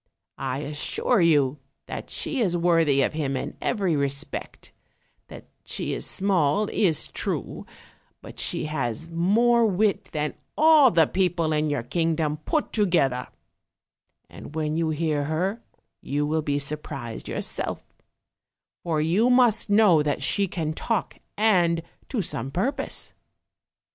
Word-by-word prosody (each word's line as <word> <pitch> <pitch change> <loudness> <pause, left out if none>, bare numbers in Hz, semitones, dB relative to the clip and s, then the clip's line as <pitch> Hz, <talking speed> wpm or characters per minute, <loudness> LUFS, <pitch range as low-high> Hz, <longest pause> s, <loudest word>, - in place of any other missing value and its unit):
I 135 +1 -3
assure 150 - 0
you 145 -4 +3 0.3
that - - -7
she 280 - -2
is 180 -5 +1
worthy 165 -5 +3
of - - -1
him 140 -4 -2
in - - -5
every 195 -8 0
respect; 140 +1 -3 0.5
that - - -11 0.2
she - - -4
is - - -2
small 190 -1 +1
is 165 -7 +1
true, - - -4 0.5
but - - -12
she - - 0
has 150 +1 -3
more 230 +8 +3
wit 200 0 +1
than 150 -1 -2 0.2
all 310 -3 +7
the 165 -6 +4
people 170 -3 0
in 150 0 +1
your 145 -5 -1
kingdom 160 +2 0
put 310 - -1
to 210 -2 +2
gether; 135 -8 +1 1.0
and 90 - -12
when 155 -1 -1
you 165 -1 0
hear 155 -2 -1
her 185 +9 -1 0.4
you 145 +1 -1
will 155 +2 0
be 145 -1 -1
surprised 140 -5 -5
yourself; - - -3 1.0
for 160 -3 -1
you 185 +10 +2
must 245 -4 +3
know 205 -6 +5
that 145 -2 -1
she 200 +8 +2
can 160 -3 -3
talk, 220 +5 -2 0.2
and 175 -6 +3 0.3
to 230 -7 -1
some 130 -5 -3
purpose. 265 - -2
165 Hz, 140 wpm, -25 LUFS, 145-200 Hz, 1.0 s, all